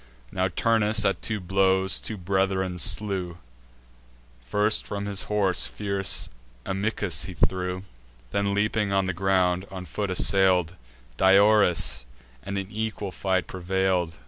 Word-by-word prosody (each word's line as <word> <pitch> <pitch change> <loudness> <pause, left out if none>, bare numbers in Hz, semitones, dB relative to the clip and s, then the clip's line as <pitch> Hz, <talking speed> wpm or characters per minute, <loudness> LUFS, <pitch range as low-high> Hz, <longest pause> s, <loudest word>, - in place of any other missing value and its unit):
Now 95 0 0
Turnus, 110 +2 +2
at 100 - 0
two 110 -2 -3
blows, 95 +1 +2
two 110 - -5
brethren 95 0 -1
slew; 95 -3 0 1.1
First 105 - +1
from 100 0 -5
his 100 -1 0
horse 100 -3 +1
fierce 100 -2 -1 0.4
Amycus 95 -3 0
he 90 0 -8
threw: 90 +2 -1 0.5
Then, 100 0 0
leaping 105 0 0
on 95 -1 +1
the 95 - -2
ground, 95 0 +1
on 95 -1 -7
foot 100 +1 -4
assail'd 95 -2 +3 0.4
Diores, 95 -7 +4 0.3
and 100 +9 -5
in 95 +1 -5
equal 110 -2 -4
fight 95 -1 -1
prevail'd. 95 -2 -1
95 Hz, 125 wpm, -25 LUFS, 95-100 Hz, 1.1 s, Diores